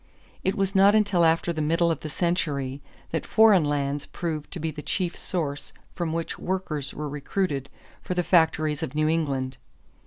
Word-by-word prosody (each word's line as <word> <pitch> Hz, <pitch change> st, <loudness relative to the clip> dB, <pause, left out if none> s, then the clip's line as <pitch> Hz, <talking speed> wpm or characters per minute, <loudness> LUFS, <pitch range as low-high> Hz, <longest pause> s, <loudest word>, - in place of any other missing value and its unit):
It 190 Hz, -, +1 dB
was 195 Hz, -2 st, 0 dB
not 200 Hz, +1 st, +6 dB
until 205 Hz, -5 st, +3 dB
after 165 Hz, +1 st, +3 dB
the 155 Hz, -, -2 dB
middle 165 Hz, +2 st, +2 dB
of 165 Hz, -, -2 dB
the 155 Hz, -, -6 dB
century 145 Hz, -5 st, -1 dB, 0.3 s
that 160 Hz, -, -1 dB
foreign 215 Hz, -5 st, +5 dB
lands 145 Hz, -1 st, -1 dB
proved 155 Hz, -4 st, -4 dB
to 180 Hz, -, -6 dB
be 160 Hz, 0 st, -2 dB
the 150 Hz, 0 st, -7 dB
chief 180 Hz, +2 st, -1 dB
source 150 Hz, -5 st, -3 dB, 0.2 s
from 170 Hz, -3 st, -2 dB
which 165 Hz, 0 st, -3 dB
workers 155 Hz, -7 st, -2 dB
were 150 Hz, 0 st, -5 dB
recruited 145 Hz, 0 st, -2 dB, 0.3 s
for 180 Hz, -, -4 dB
the 180 Hz, -, +1 dB
factories 160 Hz, -3 st, +2 dB
of 150 Hz, -3 st, -4 dB
New 155 Hz, 0 st, +2 dB
England. 135 Hz, -5 st, -1 dB
160 Hz, 180 wpm, -26 LUFS, 145-180 Hz, 0.3 s, not